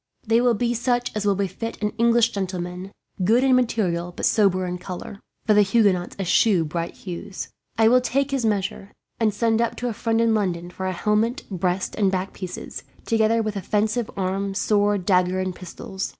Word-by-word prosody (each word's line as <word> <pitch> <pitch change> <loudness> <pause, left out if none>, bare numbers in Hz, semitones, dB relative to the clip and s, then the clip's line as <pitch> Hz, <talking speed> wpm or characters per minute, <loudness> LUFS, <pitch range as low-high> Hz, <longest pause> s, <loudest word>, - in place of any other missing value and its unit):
They 225 +1 +3
will 245 -1 +3
be 240 +3 0
such 245 0 -1
as 205 -1 -1
will 200 - +3
befit 200 +4 -4
an 210 -1 -1
English 235 0 +4
gentleman; 185 -1 -4 0.3
good 230 +7 +4
in 265 -1 +5
material 185 -8 0
but - - -3
sober 190 -4 +3
in 180 0 -4
colour, 185 +2 -7 0.3
for 215 - +4
the 210 - +6
Huguenots 195 -3 +2
eschew 195 -1 +3
bright 165 +2 -4
hues. 190 +1 -7 0.3
I 220 0 +5
will 250 +2 +5
take 275 +2 0
his 270 -3 0
measure, 200 -2 -2 0.3
and 220 -2 +3
send 225 +2 +1
up 235 - 0
to 245 - -3
a - - -3
friend 225 +1 0
in 230 -1 +3
London 180 -5 -1
for 190 +1 -4
a - - 0
helmet, 215 +7 0
breast, 180 0 -1
and 195 -3 +1
back 190 0 -2
pieces, 185 -2 -7 0.2
together 225 0 +2
with 215 -1 -3
offensive 210 +4 0
arms, 195 +1 -1
sword, 205 -3 +1
dagger, 185 -1 +2
and 185 0 -2
pistols. 190 +2 -6
205 Hz, 190 wpm, -23 LUFS, 185-230 Hz, 0.3 s, the